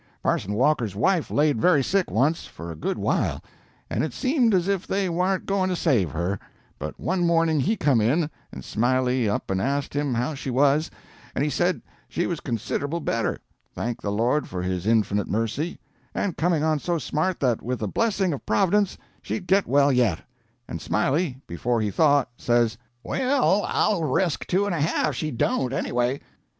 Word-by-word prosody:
Parson 100 - 0
Walker's 120 -5 +1
wife 175 - +1
laid 145 -6 +2
very 160 -7 +4
sick 195 +5 +1
once, 155 +5 +1
for 85 0 -8
a - - -7
good 75 - -2
while, - - 0 0.4
and - - -1
it 155 -5 -3
seemed 255 -4 +2
as 185 -2 +2
if 195 -2 -1
they 195 0 0
warn't 180 +2 0
going 195 -1 +1
to 180 - 0
save 125 - +2
her; 85 +5 -2 0.4
but 75 - -6
one 180 +1 0
morning 165 -2 +3
he 210 +11 +1
come 140 - +3
in, 145 +9 +2 0.2
and 65 - -9
Smiley 125 0 +1
up 100 - -2
and 95 0 0
asked 140 +3 -1
him 145 -3 0
how 125 +6 -1
she 135 -1 -5
was, 145 +4 +3 0.5
and 140 - +1
he 150 - 0
said 175 +6 0 0.3
she 175 - -1
was 170 -3 -2
considerable 140 +6 -2
better 115 -7 -1 0.4
thank 120 0 -3
the 100 - -2
Lord 120 +8 +1
for 90 -1 -4
his 90 +1 -2
inf'nite 105 -3 +2
mercy 115 +10 -2 0.4
and 195 -5 -1
coming 165 -2 +1
on 155 -1 +2
so 175 +3 -1
smart 165 +4 -1
that 125 -5 +1
with 125 +2 -2
the 110 - -3
blessing 195 - +1
of 140 - -6
Prov'dence 200 0 +2 0.2
she'd 190 - -4
get 195 +2 +3
well 140 +1 +4
yet; 120 -10 +2 0.5
and 85 - -6
Smiley, 135 +5 0
before 115 +8 -1
he 105 -2 -1
thought, 145 +2 +3
says, 120 -2 +2 0.3
'Well, 255 -6 +2
I'll 205 -5 +1
resk 160 +3 0
two 190 +3 +2
and 205 - -1
a 165 - -1
half 150 -1 +1
she 155 +5 -2
don't 130 - 0
anyway.' 125 0 -1
145 Hz, 185 wpm, -25 LUFS, 115-175 Hz, 0.5 s, very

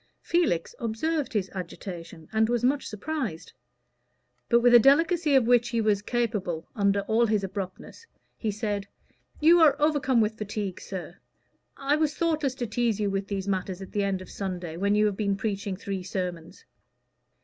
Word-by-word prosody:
Felix 325 - +1
observed 280 +7 -1
his 200 -4 -1
agitation, 175 -3 -7
and 220 +1 +3
was 240 -1 0
much 270 +3 +1
surprised; 225 - -4 1.0
but 235 - +5
with 245 0 +4
a 240 - +10
delicacy 310 +4 +4
of 260 -3 +5
which 240 0 +4
he 235 -1 0
was 210 -2 +2
capable 205 -8 -2
under 200 -1 +2
all 225 +3 +2
his 210 -2 +1
abruptness, 195 - -6 0.3
he 220 - -3
said, 205 -1 -2 0.5
"You 335 +3 +6
are 300 -3 +5
overcome 290 -5 +2
with 220 0 0
fatigue, 205 -2 -4
sir. 180 -1 -7 0.6
I 280 +2 +1
was 305 -1 0
thoughtless 310 -6 0
to 245 - -3
tease 230 -1 0
you 205 -1 0
with 195 0 -2
these 200 -1 -3
matters 190 -1 -2
at 190 - -9
the 205 - 0
end 190 -1 -1
of - - -13
Sunday, 180 -4 -5
when 200 +4 +1
you 210 0 +4
have 205 -2 0
been 200 -2 0
preaching 200 -1 -2
three 195 -1 -4
sermons." 180 - -5
210 Hz, 170 wpm, -27 LUFS, 195-250 Hz, 1.0 s, a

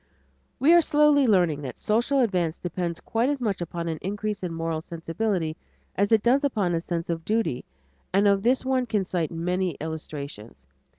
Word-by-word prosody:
We 305 +5 +5
are 345 - +7
slowly 295 -3 +4
learning 175 -8 +3
that 130 -3 -7
social 240 +6 +2
advance 180 -8 0
depends 175 -1 -3
quite 230 +4 0
as 290 -1 -1
much 205 -7 -1
upon 170 0 -4
an 160 -2 -3
increase 205 +1 -3
in 180 -2 -3
moral 165 -1 -2
sensibility 165 0 -2 0.4
as 200 +2 +1
it 220 -2 +4
does 260 +4 +3
upon 210 -10 +1
a 165 - 0
sense 170 -1 -3
of 165 -1 -3
duty, 215 - -1 0.5
and 200 +2 +3
of 200 -1 +3
this 255 +4 +2
one 260 -1 +1
could 210 -4 0
cite 175 -4 -1
many 180 0 -1
illustrations. 140 - -7
185 Hz, 180 wpm, -25 LUFS, 165-225 Hz, 0.5 s, are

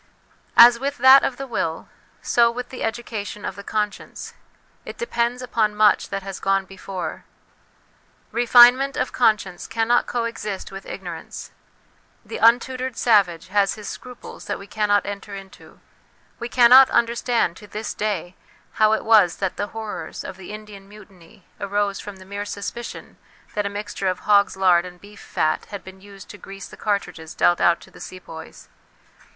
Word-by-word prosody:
As 235 0 +9
with 280 +2 -3
that 260 +2 +8
of 250 - -1
the 275 - -5
will, 165 -10 -3 0.4
so 235 -1 +4
with 245 +1 -6
the 255 - -9
education 220 -3 -4
of - - -4
the 200 - -9
conscience; 210 -1 -4 0.5
it - - -9
depends 245 - -1
upon 220 -4 0
much 210 0 +3
that 195 -1 -4
has 195 -1 -7
gone 195 0 +1
before. 190 -1 -7 1.1
Refine 240 +1 +7
ment 275 +1 -3
of - - -1
conscience 215 -6 +1
cannot 230 +1 +1
coexist 230 -4 -4
with 195 0 -9
ignorance. 175 -4 -8 0.7
The - - -6
untutored 255 +2 +2
savage 195 -9 +2
has 200 0 +2
his 210 -2 -9
scruples 250 -2 -10
that - - -3
we 200 - -11
cannot 205 0 +1
enter 200 0 -6
into; 195 -1 -13 0.6
we 235 - -5
cannot 255 +2 +7
understand 235 -5 +1
to 210 - -13
this 210 +2 -5
day 190 -4 -3 0.5
how 215 0 +6
it 220 - -1
was 210 -6 +5
that 190 -2 -3
the 205 - -3
horrors 220 0 -7
of - - -7
the 190 +1 -10
Indian 210 -2 -11
Mutiny 195 -1 -17
arose 200 0 -1
from 205 - -8
the 190 0 -14
mere 200 +1 -5
suspicion 205 +4 -7 0.4
that 205 -1 -1
a - - -3
mixture 205 -1 -4
of 185 -1 -1
hog's 200 -2 +3
lard 180 -2 +4
and 180 -1 -11
beef 205 +2 -15
fat 155 - -1
had 200 -3 -8
been 190 0 -13
used 200 -1 -13
to 205 - -12
grease 195 -1 -10
the - - -13
cartridges 180 -6 -3
dealt 175 - +3
out 170 0 +4
to - - -16
the - - -15
Sepoys. 165 -3 -10
205 Hz, 170 wpm, -22 LUFS, 195-235 Hz, 1.1 s, As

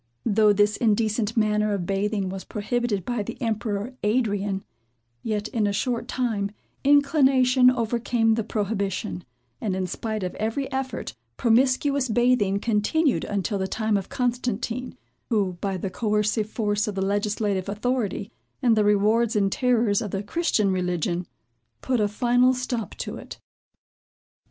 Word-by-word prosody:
Though 215 -1 +4
this 205 +1 +2
indecent 220 0 +1
manner 210 -1 +2
of 180 -3 -3
bathing 195 +1 -1
was 190 0 -6
prohibited 215 -2 -2
by 240 -3 -1
the 205 - -6
emperor 220 0 -2
Adrian; 205 -3 0 0.6
yet, 210 - -2
in 220 -5 0
a - - +1
short 230 +4 -1
time, 220 -6 -1 0.3
inclination 270 -3 +5
overcame 235 -1 +1
the 225 0 0
prohibition; 200 -3 -2 0.4
and, 200 -4 -1
in 190 0 -1
spite 215 +3 -4
of 180 - -3
every 225 +6 -2
effort, 265 0 -3 0.2
promiscuous 260 +3 +2
bathing 225 -4 +2
continued 235 +8 +1
until 200 0 -2
the 190 - -1
time 215 +2 0
of 195 -2 -2
Constantine, 245 0 -2 0.3
who, 195 -6 0
by 195 -2 -1
the 185 +1 -4
coercive 210 0 0
force 210 -1 0
of 210 - -3
the 190 0 0
legislative 205 -1 -1
authority, 215 -1 -2 0.3
and 240 -4 +3
the 215 - +3
rewards 210 +3 +3
and 195 -2 +2
terrors 235 -5 +2
of 210 - -3
the 195 +2 -3
Christian 215 - +1
religion, 180 -1 -1 0.5
put 255 -2 0
a 210 - +3
final 245 +4 +3
stop 250 -3 -3
to - - -5
it. - - -9
215 Hz, 145 wpm, -25 LUFS, 200-245 Hz, 0.6 s, inclination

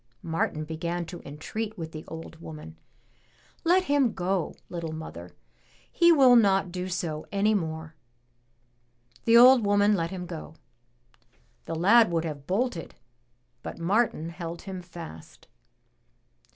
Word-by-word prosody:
Martin 160 -1 -1
began 170 +2 -3
to 175 +1 -9
entreat 210 +9 -5
with 160 -2 -6
the 155 -1 -8
old 165 0 -9
woman. 150 - -9 0.9
"Let 360 +2 +4
him 285 -8 +2
go, 185 -1 -1
little 170 -2 -5
mother; 90 - -9 0.6
he 340 0 +5
will 265 -6 +7
not 195 -5 +3
do 180 +1 -4
so 165 -4 -3
any 205 +2 +2
more." 160 -4 -3 1.3
The 230 0 +6
old 250 0 +8
woman 205 +1 +3
let 165 -4 0
him 185 -2 -6
go. 165 -2 -8 1.1
The 165 - -4
lad 205 +6 +5
would 165 -1 0
have 145 -3 -6
bolted, 195 -3 -2 0.7
but - - -7
Martin 175 -2 0
held 170 0 -7
him 190 -2 -6
fast. 170 - -11
175 Hz, 130 wpm, -27 LUFS, 160-210 Hz, 1.3 s, old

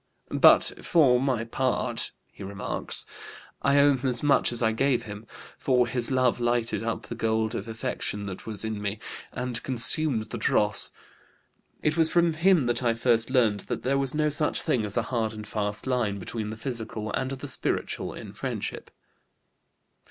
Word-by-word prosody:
"But - - +6
for 130 -7 +4
my 130 -4 0
part," 125 +2 -1 0.2
he - - -15
remarks, 100 0 -2 0.6
"I 140 0 +3
owe 140 0 +6
him 130 0 -1
as 125 +2 -1
much 145 -3 +3
as 120 - -1
I 110 - +3
gave 130 +3 +1
him, 105 +1 -9 0.3
for 125 -2 +3
his 120 0 +1
love 130 -2 +2
lighted 120 -1 0
up 115 0 -3
the - - -6
gold 110 -1 0
of 105 -1 -4
affection 105 -2 -3
that 95 +1 -7
was 110 -1 -4
in 110 -1 -3
me 100 +1 -2 0.3
and 125 -2 -3
consumed 125 -2 +2
the 115 - -4
dross. 105 0 +2 0.9
It 150 +2 +1
was 160 -1 +5
from 170 -1 +3
him 170 -2 +3
that 120 +1 0
I 120 -2 +1
first 115 -1 +2
learned 115 -6 +3
that - - -3
there 135 +2 +1
was 135 +1 -2
no 150 0 +2
such 150 +1 0
thing 115 -4 +1
as 105 - -2
a - - +2
hard 110 -2 0
and 105 -1 -8
fast 105 -1 -3
line 120 -6 0
between 105 +3 -5
the 110 - -6
physical 110 -3 -4
and 130 - -1
the 135 +1 -5
spiritual 135 - -2
in - - -9
friendship." - - -5
120 Hz, 180 wpm, -27 LUFS, 110-135 Hz, 0.9 s, But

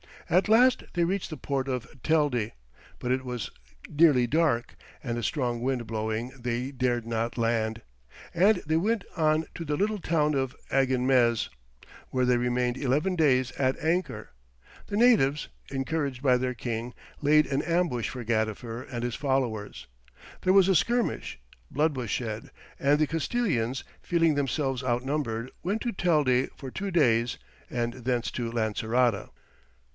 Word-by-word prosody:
At 185 +4 +4
last 245 +3 +5
they 175 - +1
reached 185 +3 -1
the 155 - -6
port 135 -1 -2
of 125 -2 -2 0.2
Telde, 145 -9 +1 0.5
but 125 - -2
as 130 - +2
it 130 - -14
was 125 -2 -4 0.4
nearly 145 -5 +4
dark 145 -3 +1 0.3
and 120 -2 -2
a - - -2
strong 120 -2 -1
wind 125 -1 -1
blowing 110 +2 -3
they 125 +2 -2
dared 125 -3 0
not 115 +1 -2
land, 115 -1 0 0.5
and 190 +3 +3
they 160 +1 +1
went 210 +4 +1
on 155 -1 +2
to 165 - -6
the 150 -1 -1
little 210 +5 0
town 155 -3 +1
of 130 -2 -1 0.2
Aginmez, 130 -3 +2 0.6
where 130 -1 +1
they 125 -1 +3
remained 125 +1 0
eleven 150 +8 +1
days 130 -6 +3
at 130 -1 +2
anchor; 155 -9 -1 0.6
the 205 - -2
natives, 180 - +4 0.2
encouraged 140 -1 -2
by 130 -3 +5
their 125 0 -2
king, 120 +1 -4 0.3
laid 150 +1 +5
an 140 +1 0
ambush 165 -8 0
for 125 -2 -6
Gadifer 115 +1 -2
and 120 -1 -3
his 120 -1 -2
followers; 130 -7 -2 0.6
there 185 - +4
was 195 -1 +6
a 190 - +4
skirmish, 235 - 0 0.3
blood 150 +1 +1
was 125 -4 -4
shed, 110 0 -3 0.3
and 140 +1 +3
the 155 - +3
Castilians, 150 - -1 0.2
feeling 165 -2 +2
themselves 135 -2 -1
outnumbered, 125 -1 -2
went 200 +5 -1
to 240 - -1
Telde 150 - +2
for 135 -2 -8
two 200 +7 -4
days, 120 -9 +2 0.3
and 120 -1 -2
thence 125 -1 -2
to 120 -2 -3
Lancerota. 115 0 0
130 Hz, 155 wpm, -27 LUFS, 120-160 Hz, 0.6 s, was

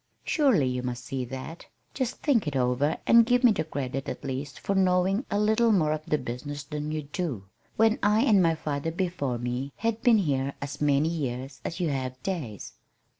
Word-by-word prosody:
Surely 265 - +3
you 125 0 -1
must 125 -1 -5
see 135 -2 -3
that. 130 +7 -8 0.3
Just 260 -3 -3
think 235 - +2
it 145 - -2
over, 130 +3 +1
and 235 0 +7
give 245 +2 +2
me 245 - +7
the 175 -7 0
credit 135 -3 -4
at - - -6
least 135 0 -5
for 200 - -1
knowing 190 +4 +2
a 205 - 0
little 220 +2 +3
more 160 -7 +3
of 155 0 -4
the 150 - +2
business 140 +3 -6
than 150 +1 -4
you 155 -1 -3
do, 145 - -4 0.3
when 225 0 +3
I 210 +2 +3
and 205 -5 +5
my 165 -2 +3
father 150 0 -3
before 165 -7 -2
me, 125 +3 -3
have 230 -1 -2
been 240 -3 +5
here 140 -7 0
as 140 +1 -6
many 145 +1 +3
years 135 -4 -4
as 170 - -5
you 175 -3 0
have 130 -2 -3
days. 145 - -4
150 Hz, 200 wpm, -27 LUFS, 135-195 Hz, 0.3 s, and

